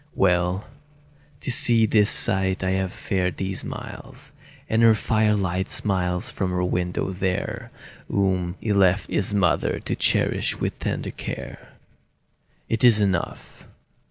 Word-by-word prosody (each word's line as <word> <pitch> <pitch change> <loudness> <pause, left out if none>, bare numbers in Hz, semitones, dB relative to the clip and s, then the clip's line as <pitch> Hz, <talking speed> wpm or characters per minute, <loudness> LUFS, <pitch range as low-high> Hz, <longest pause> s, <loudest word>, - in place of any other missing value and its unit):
Well, 90 +1 +1 0.8
to - - -2
see 120 -4 +5
this 105 -1 +3
sight 95 -3 +1
I 95 - 0
have 95 -1 -1
fared 90 -5 -2
these 95 -1 -4
miles, - - -9 0.4
And 110 +1 +1
her 115 -1 +6
firelight 105 -4 0
smiles 90 -3 -2
from 95 - -2
her 90 0 -1
window 90 +1 -1
there, 100 +6 -3 0.4
Whom 95 -3 0
he 105 - -1
left 95 0 +2
his 105 - 0
mother 95 -4 +1
to - - -3
cherish - - +1
with - - -3
tender - - -3
care! - - -8 0.9
It 115 0 -1
is 115 -4 +7
enough. 95 -4 -3
95 Hz, 130 wpm, -23 LUFS, 90-105 Hz, 0.9 s, is